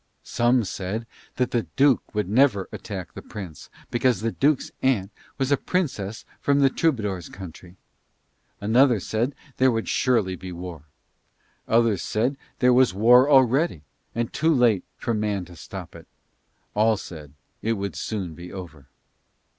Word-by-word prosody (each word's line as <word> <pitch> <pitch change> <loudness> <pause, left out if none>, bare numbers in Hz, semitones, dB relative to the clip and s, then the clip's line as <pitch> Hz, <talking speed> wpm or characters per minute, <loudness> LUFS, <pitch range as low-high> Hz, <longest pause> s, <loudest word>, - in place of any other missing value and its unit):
Some 120 +1 +2
said 100 +3 -4 0.3
the 120 -2 0
Duke 135 -5 +3
would 105 -3 0
never 110 -3 +3
attack 95 -5 -7
the - - -8
Prince 90 -8 -9 0.2
because 120 -3 +2
the 115 +1 0
Duke's 145 +3 +1
aunt 110 -7 +1 0.3
was 135 0 0
a 140 - +5
princess 120 - -2
from 140 0 +2
the 135 -1 +4
Troubadour's 105 - -1
country. 90 -1 -11 0.8
Another 120 +3 +4
said 110 +7 -1
that 140 - -26
there 130 0 +5
would 115 -2 -1
surely 110 -8 +1
be 95 0 -8
war. 85 -3 -8 0.8
Others 115 -4 +3
said 110 +5 0
that 140 - -19 0.2
there 125 0 +4
was 125 -6 +4
war 125 +6 +6
already, 135 - +4 0.3
and 115 0 -2
too 160 +3 +2
late 120 - +3
for 115 - -2
man 105 -3 -1
to 90 - -13
stop 75 - -9
it. - - -12 0.7
All 110 +1 +3
said 75 -7 -10 0.3
it 115 - +1
would 100 -2 -4
soon 95 -7 -4
be 85 +2 -10
over. 80 -8 -9
110 Hz, 155 wpm, -24 LUFS, 95-130 Hz, 0.8 s, war